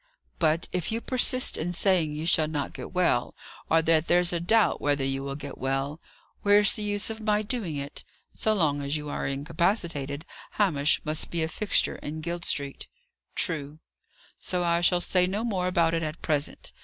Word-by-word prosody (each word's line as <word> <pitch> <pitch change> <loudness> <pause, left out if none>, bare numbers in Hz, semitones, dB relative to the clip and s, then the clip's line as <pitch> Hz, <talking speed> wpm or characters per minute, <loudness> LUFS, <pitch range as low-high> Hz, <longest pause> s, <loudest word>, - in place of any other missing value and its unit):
"But, 160 0 +2
if 180 0 -2
you 225 - -1
persist 255 +1 +1
in 175 +3 -2
saying 175 -4 +2
you 150 +2 -4
shall 160 -2 +3
not 150 -2 -3
get - - -7
well, 180 -10 +1 0.3
or 165 0 +4
that 160 0 +3
there's 175 0 +3
a 170 - 0
doubt 215 +6 +2
whether 145 -2 +1
you 135 0 -1
will 140 0 -4
get 140 -1 -8
well, 135 +3 -2 0.4
where's 205 0 +5
the - - -4
use 205 +1 -1
of 220 0 -7
my 210 0 +1
doing 210 - -2
it? 140 0 -5 0.3
So 220 - +1
long 155 -8 +2
as 140 +2 -1
you 150 0 -6
are 145 - -2
incapacitated, 150 0 -1 0.3
Hamish 160 -8 +2
must 155 0 0
be 170 -2 -1
a - - 0
fixture 205 +5 +1
in 155 +2 -6
Guild 170 +1 -3
Street." 140 -1 -1 0.5
"True." 150 -1 -2 0.6
"So 180 -1 -1
I 170 0 +2
shall 175 0 +3
say 180 0 +2
no 200 +4 -2
more 190 -6 -1
about 170 -2 +2
it 165 - 0
at 155 0 -5
present. 150 -2 -1
165 Hz, 190 wpm, -27 LUFS, 145-185 Hz, 0.6 s, where's